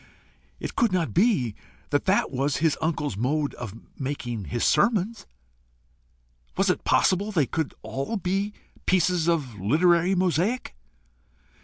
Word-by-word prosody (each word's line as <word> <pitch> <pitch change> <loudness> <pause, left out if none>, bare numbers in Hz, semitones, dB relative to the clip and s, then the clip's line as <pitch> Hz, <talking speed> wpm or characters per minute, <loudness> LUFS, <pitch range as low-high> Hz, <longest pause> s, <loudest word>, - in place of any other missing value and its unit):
It - - -5
could 235 -6 +2
not 180 -3 0
be 170 - +2 0.4
that - - +1
that - - +2
was 140 +2 0
his 160 -1 +2
uncle's 155 - -1
mode 140 +7 0
of 110 -4 -7 0.2
making 120 -6 -4
his 120 +4 -2
sermons? 210 +4 +2 1.3
Was - - +3
it - - -3
possible 200 +3 +2
they 160 -8 +2
could 160 +2 -3
all 135 +12 -3
be 195 +2 -1 0.4
pieces 180 -2 +2
of 135 - -1
literary 170 - +3
mosaic? 185 +7 0
165 Hz, 130 wpm, -25 LUFS, 135-185 Hz, 1.3 s, Was